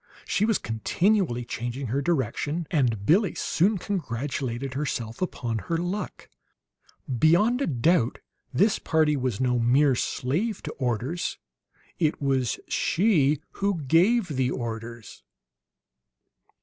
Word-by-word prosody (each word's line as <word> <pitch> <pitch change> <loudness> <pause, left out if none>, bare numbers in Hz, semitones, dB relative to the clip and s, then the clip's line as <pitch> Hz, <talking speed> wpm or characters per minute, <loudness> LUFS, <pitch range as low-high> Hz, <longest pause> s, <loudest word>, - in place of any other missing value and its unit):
She 205 - +1
was 225 -2 +2
continually 125 - 0
changing 120 +3 -4
her 140 - +1
direction; 150 +2 -1
and 120 - +1
Billie 195 - +3
soon 195 +5 +1
congratulated 135 - -3
herself 125 -4 -3
upon 120 -10 -2
her 165 - +1
luck. 180 +5 -4 0.9
Beyond 210 - +4
a - - +1
doubt, 135 -1 +2 0.3
this 205 +2 +2
party 155 -2 +2
was 125 -6 -2
no 125 -1 +1
mere 130 +4 +4
slave 160 - -1
to - - -4
orders; 130 +7 -2 0.6
it 155 -3 +1
was 135 -4 0
she 155 -7 +2 0.2
who 195 -6 0
gave 180 - +3
the 130 -3 0
orders. 115 -3 -6
145 Hz, 115 wpm, -26 LUFS, 120-175 Hz, 0.9 s, Beyond